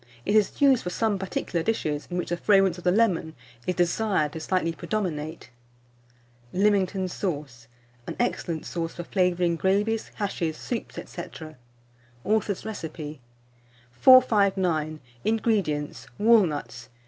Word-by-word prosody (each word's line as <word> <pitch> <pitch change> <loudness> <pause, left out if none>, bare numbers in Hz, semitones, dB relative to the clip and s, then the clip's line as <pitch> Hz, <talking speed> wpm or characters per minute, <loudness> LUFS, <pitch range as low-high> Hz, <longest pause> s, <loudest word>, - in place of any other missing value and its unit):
It 205 - +1
is 210 -2 +2
used 275 -3 +5
for 180 - -4
some 210 +1 0
particular 185 -2 -2
dishes, 155 -7 -1
in 180 - -3
which 180 - -2
the 175 - -1
fragrance 195 -2 +3
of - - -12
the 180 - +3
lemon 180 -7 +1 0.3
is 180 - 0
desired 175 -3 +1
to 160 - -5
slightly 165 0 0
predominate. 160 - -4 1.0
LEAMINGTON 195 -1 +2
SAUCE 145 - -5 0.4
(an - - -4
Excellent 170 -9 -1
Sauce 165 -1 -4
for 175 - -5
Flavouring 180 -2 +1
Gravies, 205 +5 +1
Hashes, 170 -6 -2
Soups, 240 -3 -5
&c.). 175 - -7 1.0
(Author's 210 -2 0
Recipe.) 155 -8 -6 0.7
459. 190 - +4 0.2
INGREDIENTS. 205 -9 0
Walnuts. 175 - +2
180 Hz, 125 wpm, -26 LUFS, 160-210 Hz, 1.0 s, used